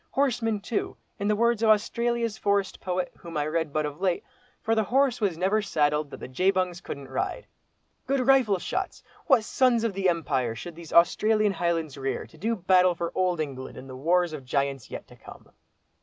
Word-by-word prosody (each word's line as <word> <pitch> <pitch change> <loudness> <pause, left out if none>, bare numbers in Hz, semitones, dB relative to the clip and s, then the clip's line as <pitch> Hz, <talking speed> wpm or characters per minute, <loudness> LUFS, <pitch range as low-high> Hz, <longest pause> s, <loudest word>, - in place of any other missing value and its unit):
Horsemen 235 -6 +1
too, 220 +1 -3 0.2
in 200 - -1
the 210 - +3
words 235 0 +2
of 225 - +3
Australia's 230 +1 +1
forest 200 -2 0
poet, 180 -1 -2
whom 170 -2 -7
I 145 - 0
read 160 0 -1
but 155 +1 0
of 150 +3 -6
late. 185 -3 +1 0.4
'For 225 - 0
the 220 -1 +2
horse 260 0 +2
was 190 -6 0
never 195 +5 +2
saddled 150 -5 +1
that - - -8
the - - -7
Jebungs 185 +5 0
couldn't 140 -5 -7
ride.' 135 - -3 0.6
Good 275 0 +1
rifle 255 -7 +4
shots! 180 - -4 0.2
What 225 - +5
sons 240 0 +2
of 230 -3 0
the 190 -1 +1
Empire 130 -9 -1
should 170 +8 -7
these 170 -1 -11
Australian 215 +5 +4
highlands 165 -6 -1
rear, 135 0 -2
to 160 - -18
do 225 +6 0
battle 185 -2 +4
for 170 0 -3
Old 180 -2 0
England 135 -4 -5
in - - -9
the 130 -1 -9
wars 170 +5 +1
of 150 - -5
the 130 - -21
giants 140 -2 -1
yet - - -7
to - - -16
come!" - - -14
185 Hz, 200 wpm, -26 LUFS, 155-220 Hz, 0.6 s, What